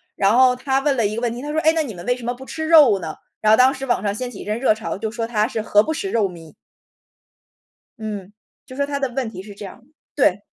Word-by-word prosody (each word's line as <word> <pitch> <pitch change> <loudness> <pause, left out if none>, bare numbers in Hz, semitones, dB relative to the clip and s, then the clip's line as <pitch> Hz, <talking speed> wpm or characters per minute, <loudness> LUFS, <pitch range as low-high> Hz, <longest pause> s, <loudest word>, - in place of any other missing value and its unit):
然 200 +3 +3
后 255 -1 +5
她 265 +1 0
问 280 -1 +1
了 230 - +2
一 210 - -4
个 230 - -3
问 235 -1 0
题， 240 - -7
她 295 +2 -5
说： 310 - 0
“诶， 315 +1 +4
那 325 - +1
你 250 -7 -6
们 175 - -9
为 245 +1 +1
什 250 - -11
么 240 +1 -2
不 260 +2 -11
吃 315 +3 -5
肉 295 -11 +6
呢？” 160 -3 -6 0.3
然 215 - +4
后 220 - +6
当 255 +1 +5
时 270 -1 -6
网 240 - 0
上 200 -1 0
掀 250 +4 -4
起 235 - -11
一 - - -8
阵 215 +2 -2
热 235 -4 +3
潮， 220 +1 -5
就 220 +2 -3
说 230 +1 -3
她 220 -2 0
是 230 - -4
“何 210 -1 +4
不 315 - -3
食 380 +5 -4
肉 210 -4 +1
糜”。 165 -3 -12 1.5
嗯， 205 -3 -6 0.3
就 255 -1 -11
说 280 0 0
他 285 0 -3
的 275 -1 -1
问 260 -3 -2
题 185 - -8
是 205 +1 -11
这 205 - -9
样 195 - -10
的。 240 - -27 0.3
对。 205 -8 +2
235 Hz, 310 characters per minute, -21 LUFS, 210-270 Hz, 1.5 s, 肉